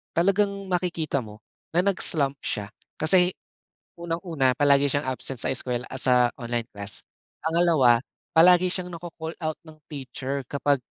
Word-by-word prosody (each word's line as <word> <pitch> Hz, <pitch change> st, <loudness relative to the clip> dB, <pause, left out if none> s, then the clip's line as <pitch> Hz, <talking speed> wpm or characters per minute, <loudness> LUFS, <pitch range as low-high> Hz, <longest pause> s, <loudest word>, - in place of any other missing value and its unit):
talagang 200 Hz, +4 st, +3 dB, 0.2 s
makikita 170 Hz, -5 st, 0 dB
mo, 105 Hz, 0 st, -13 dB, 0.3 s
na 175 Hz, -, +4 dB
nag-slump 150 Hz, -8 st, +1 dB
siya 105 Hz, -1 st, -3 dB, 0.3 s
kasi, 180 Hz, +3 st, +4 dB, 0.7 s
unang-una 165 Hz, -6 st, 0 dB
palagi 140 Hz, -1 st, +4 dB
siyang 145 Hz, -1 st, -1 dB
absent 130 Hz, 0 st, -5 dB
sa -, -, 0 dB
eskuwela 125 Hz, -1 st, -2 dB
at 130 Hz, -, -6 dB
sa 125 Hz, -1 st, +4 dB
online 120 Hz, -1 st, -2 dB
class, 100 Hz, 0 st, -7 dB, 0.4 s
pangalawa 160 Hz, -7 st, +4 dB, 0.4 s
palagi 180 Hz, +2 st, +6 dB
siyang 180 Hz, -1 st, -2 dB
na-ko-call 165 Hz, -1 st, -7 dB
out 155 Hz, -1 st, -2 dB
ng 155 Hz, -, -13 dB
teacher 135 Hz, -1 st, -4 dB
kapag 140 Hz, 0 st, +2 dB
145 Hz, 140 wpm, -25 LUFS, 130-170 Hz, 0.7 s, palagi